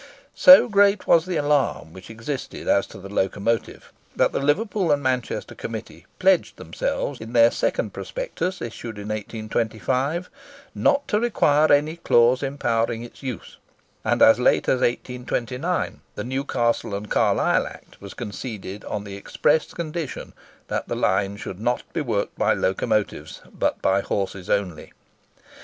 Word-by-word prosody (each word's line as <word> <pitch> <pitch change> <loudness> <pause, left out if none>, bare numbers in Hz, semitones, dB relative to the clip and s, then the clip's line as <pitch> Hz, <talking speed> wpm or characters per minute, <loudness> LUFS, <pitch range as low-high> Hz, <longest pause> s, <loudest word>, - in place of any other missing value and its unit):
So 275 -2 +8
great 200 -2 +3
was 165 +1 +4
the 180 - -2
alarm 130 - 0
which 95 +2 -12
existed 115 +5 -6
as 100 - +3
to - - -12
the 100 - -9
locomotive, 100 +3 -2 0.2
that - - +3
the - - -1
Liverpool 180 +5 +1
and 145 -1 +1
Manchester 130 -2 -2
Committee - - -8
pledged - - +2
themselves - - -3
in 115 +2 -8
their 115 -1 +6
second - - -1
prospectus, 485 - -4
issued 115 -1 -7
in 105 +1 -7
1825, 115 - -2 0.5
"not 280 0 +2
to 210 - +1
require 155 -10 +3
any 150 +3 +3
clause 120 -5 +4
empowering 120 -4 -1
its 120 - -12
use;" 130 -7 -7 0.5
and - - +3
as 110 +1 +7
late 125 - +3
as 130 - +2
1829, 125 +6 -2
the 105 - -4
Newcastle 120 -4 -1
and 105 +1 -7
Carlisle - - +2
Act - - -14
was 100 -1 -10
conceded 105 -3 -6
on 105 - -4
the 100 -1 -8
express 150 +9 0
condition 165 -3 -5 0.3
that - - -3
the - - -2
line 100 +1 0
should 95 -2 -7
not 120 +3 0
be 165 - -1
worked 115 -8 -2
by - - +3
locomotives, - - -1
but - - -1
by 95 +1 +3
horses 100 -2 -3
only. 100 -5 -2
120 Hz, 145 wpm, -23 LUFS, 105-150 Hz, 0.5 s, So